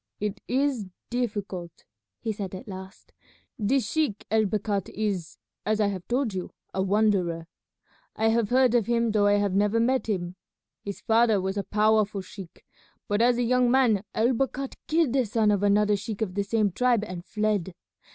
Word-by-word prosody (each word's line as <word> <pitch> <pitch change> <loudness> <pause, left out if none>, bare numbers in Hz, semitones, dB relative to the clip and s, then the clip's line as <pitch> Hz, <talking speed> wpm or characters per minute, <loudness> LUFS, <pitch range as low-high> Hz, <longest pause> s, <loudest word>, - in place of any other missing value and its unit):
"It 210 -1 -3
is 260 -5 0 0.2
difficult," 200 -8 -4 0.4
he 225 - -2
said 195 -3 -5
at 220 - -9
last; 190 -1 -10 0.5
"this 235 +4 +1
sheik 295 -7 -1
El 220 0 +3
Bakhat 205 -1 -1
is, 195 -6 -3 0.3
as 215 0 0
I 210 -1 +3
have 185 -3 -6
told 245 -3 0
you, 185 -1 -4 0.2
a 190 - 0
wanderer. 190 -4 +1 0.7
I 220 +1 +2
have 225 -2 +1
heard 255 -1 +4
of 235 -4 +2
him 235 -1 +1
though 205 -1 +3
I 205 - +4
have 205 -2 +1
never 205 +3 +2
met 250 0 +1
him. 180 -3 -2 0.5
His 200 -1 -6
father 225 -2 +3
was 190 +1 -2
a 200 - -1
powerful 215 -1 +2
sheik, 185 -2 -12 0.4
but 205 +1 +1
as 240 0 +4
a 245 - +1
young 250 +1 +3
man 240 -6 +3
El 235 +4 +3
Bakhat 270 +2 -2
killed 315 -5 +2
the 265 -2 +3
son 215 -1 +2
of 200 -2 +1
another 205 +1 +3
sheik 215 +1 -3
of 185 -4 -4
the 200 +1 0
same 210 0 +1
tribe 245 +1 +2
and 180 -4 -6
fled. 210 -4 -1
210 Hz, 180 wpm, -26 LUFS, 200-235 Hz, 0.7 s, heard